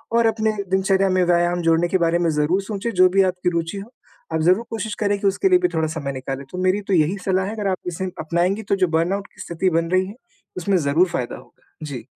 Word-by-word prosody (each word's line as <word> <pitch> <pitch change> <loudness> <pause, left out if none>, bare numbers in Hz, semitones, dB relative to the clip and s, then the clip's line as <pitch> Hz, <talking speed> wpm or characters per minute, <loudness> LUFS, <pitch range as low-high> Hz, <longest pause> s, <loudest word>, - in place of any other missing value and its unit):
और 235 0 +4
अपने 220 0 +1 0.2
दिनचर्या 190 0 +2
में 185 -1 +2
व्यायाम 175 0 +2
जोड़ने 165 +1 +2
के 190 - +1
बारे 170 0 +1
में 170 - +1
ज़रूर 170 +6 +2
सोचें, 205 +3 -4
जो 185 0 +5
भी 195 +1 +3
आपकी 180 -1 0
रुचि 170 +4 -2
हो 200 +3 -10 0.4
आप 160 - 0
ज़रूर 185 +7 +3
कोशिश 220 -2 -4
करें 205 -1 +1
कि 200 - +1
उसके 195 - +2
लिए 365 -1 +5
भी 360 - +2
थोड़ा 160 -1 0
समय 150 -3 -4
निकालें, 135 +1 -5
तो 180 - -7
मेरी 185 +3 +2
तो 195 - 0
यही 165 +3 +2
सलाह 190 0 +1
है 205 - -4
अगर 210 -2 -2
आप 185 - -1
इसे 180 +2 -3
अपनाएँगी, 175 +6 0
तो 200 - 0
जो 185 -2 +2
बर्नआउट 195 +5 0
की - - -11
स्थिति 175 +2 -1
बन 165 0 -1
रही 185 0 +3
है 205 - -9 0.4
उसमें 190 +2 +1
ज़रूर 160 +3 +2
फ़ायदा 125 -8 -3
होगा। - - -20
जी। 135 -6 -6
185 Hz, 245 wpm, -21 LUFS, 165-195 Hz, 0.4 s, जो